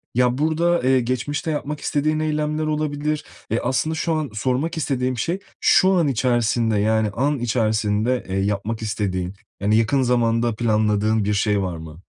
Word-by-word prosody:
Ya, 125 0 +2
burada, 165 +3 +1
eee, 130 0 +4
geçmişte 130 +6 -2
yapmak 150 0 -3
istediğin 155 +2 0
eylemler 155 0 -1
olabilir. 150 0 -2 0.3
Eee, 115 - +1
aslında 130 +6 0
şu 165 +1 -1
an 155 -4 -1
sormak 130 +9 -1
istediğim 130 -4 -1
şey, 175 +9 -1 0.2
şu 190 +1 +5
an 170 -5 +3
içerisinde, 120 -3 +1
yani 110 0 +2
an 135 +6 0
içerisinde, 110 0 0
eee, 95 +1 -1
yapmak 105 +3 -2
istediğin, 100 -4 -2 0.3
yani 105 +2 +2
yakın 125 +5 +2
zamanda 120 -2 +1
planladığın 110 -1 +1
bir 105 - +1
şey 105 0 +1
var 90 -3 -3
mı? 80 +1 -11
120 Hz, 160 wpm, -22 LUFS, 110-150 Hz, 0.3 s, şu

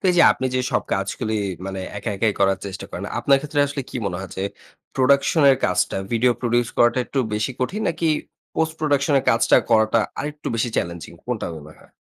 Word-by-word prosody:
তো - - -24
এইযে 175 -1 +5
আপনি 130 - -3
যে 130 - +2
সব - - +2
কাজগুলি 100 +3 -2 0.3
মানে 95 -1 -4 0.2
একা 105 - -4
একাই 105 +1 +2
করার 95 -1 +3
চেষ্টা 95 0 -6
করেন, - - -6
আপনার 140 -1 +4
ক্ষেত্রে 150 0 -1
আসলে 140 0 -4
কি - - -5
মনে 90 -2 -2
হয় 95 - -8
যে 95 - -2 0.5
প্রোডাকশন 140 +4 +3
এর 135 - +4
কাজটা 90 - 0 0.2
ভিডিও 120 +2 +3
প্রোডিউস 120 -1 +1
করাটা 120 +2 +4
একটু 140 - -3 0.2
বেশি 105 +5 -1
কঠিন 195 +12 -1
নাকি 165 0 -1 0.5
পোস্ট 160 0 0
প্রোডাকশন 145 -1 +2
এর - - -4
কাজটা 115 - +4
করাটা 110 0 +4 0.2
আরেকটু 150 +1 -4
বেশি 115 +1 0
চ্যালেঞ্জিং 85 -1 -3
কোনটা 125 -3 -3
মনে 75 0 -11
হয়? - - -21
120 Hz, 200 wpm, -22 LUFS, 100-140 Hz, 0.5 s, এইযে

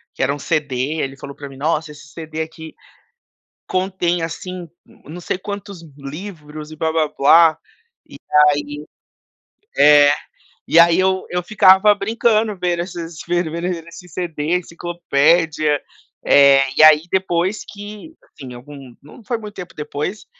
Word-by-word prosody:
que - - -2
era 140 - +1
um 145 - -7
CD, 150 -3 -2 0.3
ele 135 0 -4
falou 140 0 -10
pra 140 - -9
mim: 135 - -13
"Nossa, 155 +2 -1
esse 150 0 -14
CD 160 +1 -7
aqui 160 0 -8 0.9
contém, 185 -2 -1
assim, 175 +2 -6 0.4
não 165 +5 -9
sei 175 - -3
quantos 200 -2 -8 0.2
livros 150 0 -9
e 155 - -10
blá 160 0 -1
blá 160 -1 +1
blá.". 160 +3 +4 0.5
E - - -12 0.3
aí 145 +1 -4 0.9
é, 145 -1 +7 0.6
e 165 - +4
aí 170 +1 +6
eu 190 0 0
eu 180 0 -2
ficava 195 +1 +5
brincando, 220 0 0
vendo 175 -1 -1
esses 170 -3 -8
vendo 175 -2 0
vendo 170 +2 -4 0.2
esses 175 0 -13
CDs, 170 0 -2
enciclopédia, 160 -3 +1 0.4
eh, 140 -1 +6 0.2
e - - +6
aí 155 -1 +7
depois 190 +1 -1
que, 210 +9 -10
assim, 130 -5 -12
algum 135 0 -12
não 150 - -15
foi 235 - -2
muito 210 -2 -10
tempo 180 -1 -9
depois, 150 +7 -5
165 Hz, 145 wpm, -19 LUFS, 150-185 Hz, 0.9 s, é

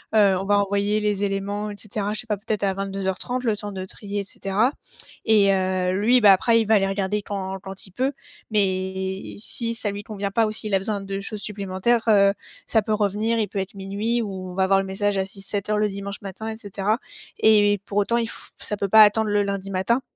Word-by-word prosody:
heu, 200 -3 +5
on 190 - -4
va 205 +1 +3
envoyer 200 +1 +1
les 205 -1 0
éléments 200 +1 -2
et - - -7
cetera, 210 0 -3
je 215 - 0
sais - - -16
pas 210 - 0
peut-être 210 +1 -3
à 195 -1 +2
22:30, 195 +5 -3
le 220 -4 +1
temps 205 0 -5
de 190 -1 -4
trier 205 +1 -4
et - - -5
cetera 200 +5 0 0.5
et 205 -3 +5
heu, 185 -1 0
lui 245 +4 +4
bah, 205 -2 +8
après, 230 +4 +3
il - - -1
va 220 - +5
aller 195 -2 +3
regarder 195 +1 -1
quand 195 -1 -4
quand 190 0 -5
il - - -17
peut, 260 +8 -1 0.4
mais 190 -1 -1
si 230 +2 -3
ça 215 -2 -2
lui 200 +1 -6
convient 200 -2 -4
pas 225 +2 +3
ou - - -2
s'il 215 -1 -3
a - - +6
besoin 205 +1 -2
de 195 0 -4
choses 210 +1 -6
supplémentaires, 200 +3 0
heu, 210 -2 +6 0.5
ça 220 - +3
peut 215 +1 -1
revenir, 210 +2 +1
il 215 - +1
peut 205 - -7
être 190 0 -4
00:00 200 +5 -1
ou 190 -4 -5
on - - -9
va 190 - 0
avoir 195 +1 +4
le 195 - -2
message 200 +1 -1
à 190 - +1
06:00-07:00 200 +2 -3
le 210 0 +2
dimanche 200 0 -6
matin 205 +2 -6
et 220 - -7
cetera 210 +1 -1 0.4
et 205 -2 +5
pour 200 - -4
autant, 235 +3 +1
il 230 -1 0
f - - -12
ça 210 - -4
peut 200 0 -2
pas 220 +3 +8
attendre 215 +1 +3
le 205 0 +3
lundi 200 -1 -3
matin, 195 +7 +1
200 Hz, 235 wpm, -23 LUFS, 195-215 Hz, 0.5 s, bah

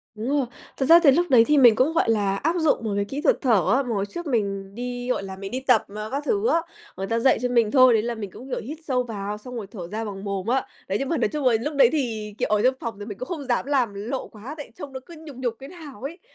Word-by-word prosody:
Đúng 225 +5 -4
rồi. 285 -2 +1 0.3
Thật 265 - 0
ra 335 +4 +8
thì 280 - +8
lúc 340 +6 +3
đấy 240 -4 +7
thì 300 -1 +4
mình 240 -5 +7
cũng, 275 +8 +2
gọi 330 - +2
là, 200 -3 +2
áp 325 - 0
dụng 310 -7 +2
một 220 - -2
cái 200 - 0
kỹ 275 +8 -5
thuật - - +3
thở 225 - +3
á, 275 - +2
mà 245 - -7
hồi 195 - 0
trước 345 +11 -7
mình 200 -6 -2
đi, 245 +1 -4
gọi 225 - 0
là, 190 -1 -7
mình 195 +2 -7
đi 255 - -2
tập, 250 -4 +3
à, 215 0 -4
các 280 +2 -2
thứ 425 +3 +1
á 335 -9 +3 0.4
người 195 0 -3
ta 230 0 0
dạy 260 +1 +3
cho 250 - 0
mình 235 -3 +2
thôi, 255 -3 +7
đấy 220 - +3
là 235 0 -2
mình 205 -4 -6
cũng, 260 +3 -11
kiểu, - - -2
hít 295 +8 -7
sâu 250 -2 +1
vào 210 -3 -5
xong 250 +4 -10
rồi 215 -5 -5
thở 180 -7 -7
ra 220 +4 -4
bằng 200 -1 -7
mồm 200 -1 -3
á. 260 +2 +1 0.2
Đấy, 195 - 0
nhưng 275 - -2
mà 330 - +1
nói - - +2
chung 300 -3 -4
là 245 - +5
lúc 295 +4 -3
đấy 280 - +6
thì, 225 -8 -2
kiểu, - - -1
ở 210 -1 +2
trong 255 +1 +4
phòng 225 -4 -5
thì 205 - -6
mình 205 -3 -7
cũng 255 - -6
không 315 -5 -4
dám 250 0 0
làm 260 -7 +1
lộ 225 +7 -4
quá 225 +7 -9
tại 290 - -9
trông 275 -2 -9
nó 260 - -5
cứ 340 - -12
nhục 305 -4 -11
nhục 245 -2 -2
thế 270 - -9
nào 310 - -11
ấy. 320 +7 -6
245 Hz, 310 wpm, -24 LUFS, 210-275 Hz, 0.4 s, ra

